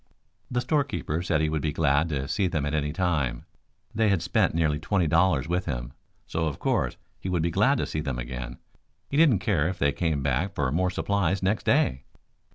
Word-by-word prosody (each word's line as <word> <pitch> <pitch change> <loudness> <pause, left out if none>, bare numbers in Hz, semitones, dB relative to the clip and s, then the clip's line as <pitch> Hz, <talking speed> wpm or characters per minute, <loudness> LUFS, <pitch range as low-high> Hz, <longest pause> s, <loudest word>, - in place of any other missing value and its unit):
The 125 0 0
storekeeper 140 - -1
said 85 -3 +1
he 80 - +1
would 75 -1 -1
be 75 - 0
glad 75 +1 +2
to 70 -3 -2
see 95 +5 +1
them 80 -5 -1
at 75 - -2
any 75 -1 0
time. 75 -9 -1 0.5
They 110 0 +2
had 95 -5 +1
spent - - +1
nearly 80 -3 +1
twenty 95 +3 +1
dollars 80 -3 +2
with 90 +2 -1
him, - - -4 0.3
so 80 0 -1
of 70 - -3
course - - 0 0.2
he 95 - -5
would 90 -3 0
be 85 - 0
glad - - +3
to - - -1
see 75 - -3
them 70 -5 -3
again. - - -6 0.5
He 140 - 0
didn't 150 -9 +6
care 80 -7 +2
if 90 - -3
they 70 0 +2
came 80 -3 -1
back 75 +9 0
for 70 -3 0
more 90 +5 +1
supplies 95 -1 0
next 100 +3 0
day. 65 +1 +2
80 Hz, 210 wpm, -26 LUFS, 70-95 Hz, 0.5 s, didn't